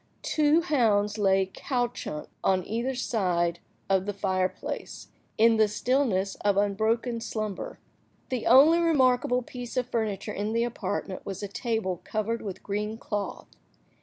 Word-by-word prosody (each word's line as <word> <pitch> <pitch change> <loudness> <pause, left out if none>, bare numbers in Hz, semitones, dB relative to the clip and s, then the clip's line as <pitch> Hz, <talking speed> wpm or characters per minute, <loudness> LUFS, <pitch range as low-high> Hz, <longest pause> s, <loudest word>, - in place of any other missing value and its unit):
Two 305 +1 +3
hounds 220 - +2
lay 195 -1 +3
couchant 240 - -3 0.2
on 185 -2 +2
either 235 +4 -2
side 175 -8 0 0.3
of 190 0 +1
the 205 - -2
fire–place, 185 -2 -3 0.3
in 225 +1 +5
the 215 -1 +5
stillness 210 -3 +1
of 205 -1 +1
unbroken 220 +4 +1
slumber. 215 -3 -4 0.5
The 255 -3 -2
only 290 +7 +7
remarkable 255 -6 +3
piece 245 0 -7
of 250 - 0
furniture 215 -4 -2
in 210 +2 -2
the 230 0 +2
apartment 205 -4 -3
was 195 +1 -6
a - - -2
table 205 -4 -2
covered 220 +2 -2
with 195 -4 -7
green 210 +2 -3
cloth. 205 -3 -4
215 Hz, 135 wpm, -27 LUFS, 195-245 Hz, 0.5 s, only